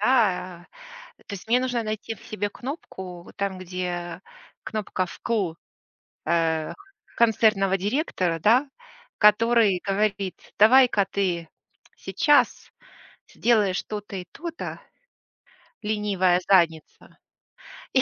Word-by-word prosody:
да? 185 Hz, -7 st, +1 dB, 0.6 s
То -, -, -9 dB
есть 190 Hz, -, -10 dB
мне 245 Hz, +2 st, +4 dB
нужно 250 Hz, -2 st, -1 dB
найти 215 Hz, +1 st, -4 dB
в 200 Hz, -, -19 dB
себе 205 Hz, -1 st, -3 dB
кнопку, 190 Hz, -, -8 dB
вот -, -, -16 dB
там, 200 Hz, -2 st, -2 dB
где 175 Hz, -1 st, -5 dB, 0.4 s
кнопка 205 Hz, -4 st, -2 dB
"вкл", 195 Hz, -3 st, -2 dB, 0.7 s
э, 160 Hz, -1 st, 0 dB, 0.4 s
концертного 215 Hz, -4 st, +3 dB
директора, 190 Hz, -, -1 dB
да, 245 Hz, -, +3 dB, 0.5 s
который 210 Hz, -2 st, +4 dB
говорит: 195 Hz, -1 st, 0 dB, 0.2 s
"Давай-ка 225 Hz, -2 st, +6 dB
ты 175 Hz, -4 st, -1 dB, 0.5 s
сейчас 295 Hz, -3 st, +2 dB, 0.6 s
сделаешь 210 Hz, -6 st, +1 dB
то-то 205 Hz, -2 st, -7 dB
и 180 Hz, -, -6 dB
то-то, 335 Hz, 0 st, -6 dB, 1.0 s
ленивая 200 Hz, -4 st, +1 dB
задница, 170 Hz, -5 st, +1 dB, 0.8 s
и 260 Hz, -, +5 dB
200 Hz, 100 wpm, -25 LUFS, 180-225 Hz, 1.0 s, Давай-ка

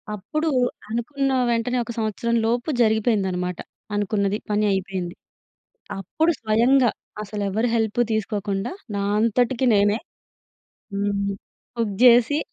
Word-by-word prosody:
అప్పుడూ 305 Hz, -, -2 dB, 0.4 s
అనుకున్న 270 Hz, +5 st, -1 dB, 0.2 s
వెంటనే 235 Hz, +2 st, 0 dB
ఒక 235 Hz, -, -6 dB
సంవత్సరం 225 Hz, +1 st, -1 dB
లోపు 240 Hz, +5 st, 0 dB
జరిగిపోయిందనమాట. 200 Hz, -6 st, +1 dB, 0.4 s
అనుకున్నది 205 Hz, 0 st, 0 dB
పని 210 Hz, 0 st, +2 dB
అయిపోయింది. 185 Hz, -2 st, -3 dB, 0.8 s
అప్పుడు 315 Hz, -, +1 dB
స్వయంగా 240 Hz, +3 st, +4 dB, 0.3 s
అసలెవరి 210 Hz, +2 st, -1 dB
హెల్ప్ 225 Hz, 0 st, 0 dB
తీసుకోకుండా, 210 Hz, 0 st, -2 dB, 0.2 s
నా 200 Hz, -, -1 dB, 0.2 s
అంతటికి 245 Hz, +3 st, +2 dB
నేనే 205 Hz, +2 st, +3 dB, 0.9 s
హ్మ్. 200 Hz, 0 st, -1 dB, 0.4 s
కుక్ 220 Hz, -4 st, -1 dB
జేసి 245 Hz, +4 st, +6 dB
220 Hz, 100 wpm, -23 LUFS, 200-240 Hz, 0.9 s, జేసి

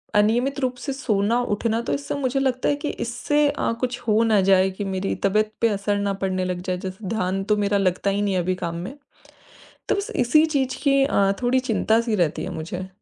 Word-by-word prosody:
अनियमित 240 Hz, +7 st, +2 dB
रूप 255 Hz, -2 st, -1 dB
से 270 Hz, +2 st, -4 dB
सोना-उठना 225 Hz, -2 st, 0 dB
तो 235 Hz, -, -2 dB
इससे 280 Hz, 0 st, -3 dB
मुझे 270 Hz, -1 st, -1 dB
लगता 260 Hz, -2 st, 0 dB
है 290 Hz, -, +2 dB
कि 290 Hz, +1 st, -4 dB
इससे 290 Hz, +5 st, 0 dB
अ, 285 Hz, -, -1 dB
कुछ 245 Hz, -1 st, -2 dB
हो 215 Hz, 0 st, +4 dB
ना 220 Hz, -3 st, +3 dB
जाए 190 Hz, 0 st, +5 dB
कि 200 Hz, +2 st, -5 dB
मेरी 190 Hz, 0 st, -2 dB
तबीयत 215 Hz, +2 st, +2 dB
पे 230 Hz, -, +4 dB
असर 205 Hz, 0 st, -1 dB
ना 200 Hz, 0 st, 0 dB
पड़ने 185 Hz, -1 st, 0 dB
लग 180 Hz, -1 st, -3 dB
जाए। 185 Hz, -1 st, -2 dB
जैसे 190 Hz, +2 st, -7 dB
ध्यान 195 Hz, -2 st, -1 dB
तो 210 Hz, +1 st, +1 dB
मेरा 205 Hz, 0 st, +1 dB
लगता 190 Hz, 0 st, +1 dB
ही 200 Hz, +1 st, -1 dB
नहीं 205 Hz, -1 st, 0 dB
है -, -, +2 dB
अभी 185 Hz, +1 st, -1 dB
काम 170 Hz, -2 st, -4 dB
में। 185 Hz, +12 st, -6 dB, 0.9 s
तो -, -, +3 dB
बस 400 Hz, +3 st, -4 dB
इसी 280 Hz, +6 st, +4 dB
चीज़ 275 Hz, -5 st, -1 dB
की 275 Hz, -1 st, +4 dB
अ, 200 Hz, -8 st, +2 dB
थोड़ी 250 Hz, +2 st, +3 dB
चिंता-सी 230 Hz, -2 st, +1 dB
रहती 170 Hz, -6 st, 0 dB
है -, -, -4 dB
मुझे। 180 Hz, +4 st, -5 dB
215 Hz, 215 wpm, -23 LUFS, 195-255 Hz, 0.9 s, जाए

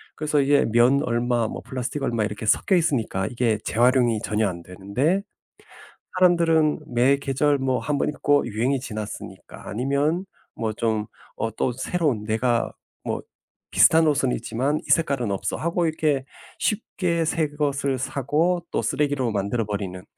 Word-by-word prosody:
그래서 150 Hz, -1 st, 0 dB
이게 140 Hz, +1 st, +3 dB
면 120 Hz, +5 st, +4 dB
얼마 120 Hz, -2 st, 0 dB
뭐 -, -, -6 dB
플라스틱 130 Hz, +2 st, -4 dB
얼마 115 Hz, -4 st, 0 dB
이렇게 105 Hz, +1 st, -4 dB
섞여 190 Hz, -, +3 dB
있으니까 125 Hz, -, 0 dB
이게 120 Hz, -3 st, 0 dB
재활용이 120 Hz, -1 st, +3 dB
전혀 110 Hz, 0 st, +1 dB
안 85 Hz, -3 st, -5 dB
되는데 110 Hz, -, -1 dB, 0.9 s
사람들은 170 Hz, -4 st, +3 dB
매 130 Hz, +4 st, +4 dB
계절 140 Hz, +1 st, +1 dB
뭐 130 Hz, -1 st, 0 dB
1 145 Hz, -1 st, -1 dB
번 -, -, 0 dB
입고 145 Hz, -2 st, +1 dB
'유행이 120 Hz, +5 st, 0 dB
지났으니까.' 110 Hz, -5 st, -8 dB
아니면 140 Hz, -, 0 dB, 0.3 s
뭐 110 Hz, -1 st, -2 dB
좀 110 Hz, -1 st, -1 dB, 0.3 s
어 115 Hz, -, -2 dB
또 120 Hz, +3 st, -1 dB
새로운 130 Hz, -4 st, -1 dB
'내가 115 Hz, +2 st, 0 dB, 0.3 s
뭐 -, -, -3 dB, 0.5 s
비슷한 160 Hz, 0 st, +6 dB
옷은 140 Hz, -4 st, +2 dB
있지만 130 Hz, +6 st, -1 dB
이 -, -, -9 dB
색깔은 140 Hz, -9 st, +2 dB
없어.'하고 165 Hz, -, -1 dB
이렇게 150 Hz, -4 st, 0 dB, 0.3 s
쉽게 180 Hz, -6 st, -1 dB
새것을 145 Hz, -4 st, -1 dB
사고 155 Hz, +7 st, 0 dB
또 -, -, 0 dB
쓰레기로 140 Hz, -4 st, 0 dB
만들어 105 Hz, +3 st, -1 dB
버리는 100 Hz, -3 st, -5 dB
130 Hz, 310 characters per minute, -24 LUFS, 115-150 Hz, 0.9 s, 비슷한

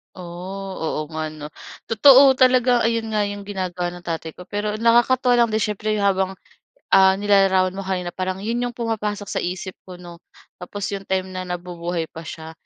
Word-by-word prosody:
Oh, 185 Hz, +2 st, -7 dB
oo 160 Hz, -1 st, -3 dB
nga 155 Hz, 0 st, -4 dB
'no. 150 Hz, -1 st, -8 dB, 0.4 s
Totoo 265 Hz, +4 st, +7 dB
talaga 250 Hz, -1 st, +4 dB
ayun 225 Hz, -1 st, -1 dB
nga 210 Hz, -, +2 dB
'yong 205 Hz, 0 st, -5 dB
ginagawa 180 Hz, -3 st, -3 dB
ng 175 Hz, -, -12 dB
tatay 165 Hz, -2 st, -5 dB
ko, 180 Hz, -, -10 dB
pero 205 Hz, +3 st, -3 dB
nakakatuwa 240 Hz, +2 st, +3 dB
lang 235 Hz, -1 st, +4 dB
din 220 Hz, -, +1 dB
siyempre 215 Hz, +1 st, -2 dB
habang, 190 Hz, -2 st, +1 dB, 0.6 s
ah, 190 Hz, 0 st, +6 dB
nilalarawan 195 Hz, -2 st, +3 dB
mo 190 Hz, -, -8 dB
kanina 185 Hz, -2 st, -3 dB
parang 185 Hz, +2 st, -4 dB
'yon 230 Hz, +3 st, -1 dB
'yong 245 Hz, -1 st, -3 dB
pumapasok 215 Hz, -3 st, -3 dB
sa 200 Hz, -, -3 dB
isip 185 Hz, +1 st, -4 dB, 0.2 s
ko 185 Hz, -, -9 dB
'no, 175 Hz, -1 st, -12 dB, 0.4 s
tapos 200 Hz, +3 st, -7 dB
'yong 195 Hz, -1 st, -6 dB
time 190 Hz, 0 st, -1 dB
na 185 Hz, 0 st, -5 dB
nabubuhay 175 Hz, -1 st, -4 dB
pa 165 Hz, 0 st, -9 dB
siya. 160 Hz, 0 st, -8 dB
195 Hz, 180 wpm, -22 LUFS, 180-215 Hz, 0.6 s, Totoo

